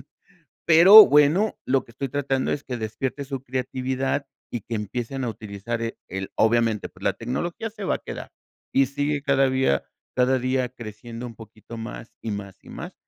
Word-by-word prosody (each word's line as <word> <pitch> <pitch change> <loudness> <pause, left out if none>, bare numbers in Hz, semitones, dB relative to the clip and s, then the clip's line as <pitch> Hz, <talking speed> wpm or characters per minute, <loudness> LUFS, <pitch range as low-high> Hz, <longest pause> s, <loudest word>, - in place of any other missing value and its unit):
sirven, - - -16 0.6
pero 185 +6 +10
bueno, 150 +9 +4
lo 130 0 +2
que - - -18
estoy 135 +3 -4
tratando 135 0 -1
es 145 - -3
que 125 - -5
despiertes 125 +5 -4
su 135 -2 -4
creatividad 130 +2 -2 0.2
y 120 - -3
que 115 +3 -4
empiecen 120 +5 -4
a - - -1
utilizar, 110 +1 -5
eh, 115 - -3
el 95 +1 -5
obviamente, 115 -2 +2
pues, - - -20
la - - +1
tecnología 170 - -3
se 210 -1 -10
va - - +1
a - - -15
quedar, - - -8 0.4
y 135 0 +4
sigue 145 +1 -1
cada 135 -2 +3
día 130 - +2 0.3
cada 130 +1 +3
día 130 0 0
creciendo 115 0 -8
un 115 - -9
poquito 110 +1 -12
más, 115 0 -8
y 110 - -3
más, 100 -2 -6
y - - -16
más, - - -8
125 Hz, 190 wpm, -24 LUFS, 115-140 Hz, 0.6 s, pero